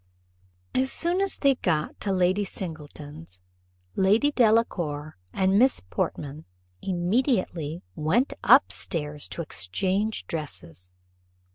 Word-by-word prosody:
As 265 Hz, +1 st, +1 dB
soon 345 Hz, +3 st, 0 dB
as 395 Hz, -1 st, -1 dB
they 275 Hz, -1 st, +4 dB
got 160 Hz, -11 st, -1 dB
to 200 Hz, -, -2 dB
Lady 185 Hz, +2 st, +2 dB
Singleton's, 155 Hz, -, -8 dB, 0.6 s
Lady 210 Hz, +9 st, +3 dB
Delacour 180 Hz, -, +1 dB, 0.2 s
and 190 Hz, -, +2 dB
Miss 260 Hz, +2 st, +4 dB
Portman 145 Hz, +10 st, -4 dB, 0.4 s
immediately 180 Hz, -, 0 dB
went 160 Hz, -, +1 dB
up -, -, +6 dB
stairs 150 Hz, -3 st, -3 dB
to 170 Hz, -, -4 dB
exchange 185 Hz, -, -1 dB
dresses. 90 Hz, -, -7 dB
180 Hz, 105 wpm, -26 LUFS, 150-220 Hz, 0.6 s, up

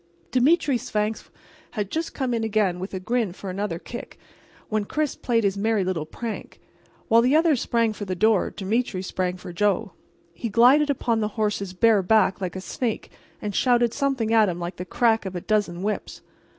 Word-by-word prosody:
Demetre 270 Hz, 0 st, +3 dB
Svangvsk 215 Hz, 0 st, -2 dB, 0.5 s
was 210 Hz, -, 0 dB
just 320 Hz, -, -4 dB
coming 250 Hz, -4 st, -1 dB
in 225 Hz, -, -2 dB
again 210 Hz, -5 st, +1 dB
with 190 Hz, +1 st, -5 dB
a -, -, -2 dB
grin 230 Hz, +1 st, -1 dB
for 190 Hz, 0 st, -7 dB
another 195 Hz, -2 st, -3 dB
kick 240 Hz, +7 st, -9 dB, 0.5 s
when 215 Hz, -1 st, 0 dB
Chris 300 Hz, +6 st, -1 dB
played 230 Hz, -2 st, 0 dB
his 200 Hz, -1 st, +1 dB
merry 215 Hz, -1 st, +1 dB
little 175 Hz, -4 st, -2 dB
prank. 230 Hz, +5 st, -6 dB, 0.5 s
While 230 Hz, +1 st, +5 dB
the 255 Hz, +5 st, +3 dB
others 315 Hz, -5 st, +3 dB
sprang 230 Hz, -2 st, +1 dB
for 205 Hz, -, -6 dB
the 185 Hz, -1 st, -3 dB
door 215 Hz, +1 st, +3 dB
Demetre 205 Hz, -1 st, -2 dB
sprang 185 Hz, -1 st, -2 dB
for 180 Hz, -1 st, -9 dB
Joe. 205 Hz, +2 st, +1 dB, 0.4 s
He 230 Hz, +7 st, -4 dB
glided 255 Hz, +7 st, +5 dB
upon 240 Hz, -4 st, 0 dB
the 210 Hz, -, 0 dB
horse's 200 Hz, -3 st, -1 dB
bare 220 Hz, +1 st, +4 dB
back 195 Hz, 0 st, +3 dB
like 185 Hz, -2 st, -3 dB
a 190 Hz, -, -4 dB
snake 220 Hz, +5 st, -3 dB, 0.3 s
and 205 Hz, -1 st, -3 dB
shouted 240 Hz, +1 st, +3 dB
something 270 Hz, -6 st, 0 dB
at 220 Hz, -3 st, +5 dB
him 175 Hz, -1 st, -4 dB
like 175 Hz, +1 st, -5 dB
the 180 Hz, -, -5 dB
crack 225 Hz, +4 st, +2 dB
of 185 Hz, -, -6 dB
a 175 Hz, -, -3 dB
dozen 195 Hz, -4 st, 0 dB
whips. 210 Hz, +1 st, -3 dB
215 Hz, 190 wpm, -24 LUFS, 190-235 Hz, 0.5 s, While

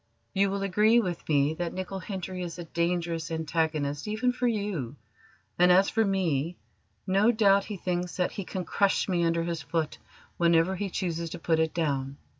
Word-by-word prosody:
"You 200 Hz, 0 st, +3 dB
will 195 Hz, 0 st, -2 dB
agree 210 Hz, +4 st, +4 dB
with 180 Hz, -8 st, -3 dB
me 145 Hz, 0 st, +3 dB
that 175 Hz, 0 st, -3 dB
Nicol 185 Hz, +1 st, -4 dB
Hendry 185 Hz, -1 st, -5 dB
is 175 Hz, -1 st, -5 dB
a 175 Hz, -, -5 dB
dangerous 170 Hz, -1 st, -1 dB
antagonist 160 Hz, -1 st, -1 dB
even 220 Hz, +4 st, +1 dB
for 250 Hz, 0 st, 0 dB
you, 200 Hz, -, -2 dB, 0.6 s
and 180 Hz, 0 st, +6 dB
as 190 Hz, +2 st, +5 dB
for 225 Hz, -, +2 dB
me 175 Hz, -5 st, 0 dB, 0.5 s
no 195 Hz, +4 st, +4 dB
doubt 200 Hz, -3 st, +4 dB
he 210 Hz, -, -5 dB
thinks 180 Hz, 0 st, -3 dB
that 180 Hz, -, +1 dB
he 200 Hz, -, -5 dB
can 185 Hz, 0 st, -5 dB
crush 200 Hz, -1 st, +1 dB
me 175 Hz, -3 st, +1 dB
under 165 Hz, 0 st, +1 dB
his 170 Hz, -1 st, -3 dB
foot 155 Hz, +2 st, -2 dB, 0.4 s
whenever 170 Hz, +2 st, +3 dB
he 200 Hz, +1 st, -3 dB
chooses 170 Hz, -2 st, -2 dB
to 175 Hz, -, -6 dB
put 165 Hz, -1 st, +1 dB
it 160 Hz, -1 st, +2 dB
down. 140 Hz, -4 st, -1 dB
175 Hz, 185 wpm, -28 LUFS, 165-195 Hz, 0.6 s, and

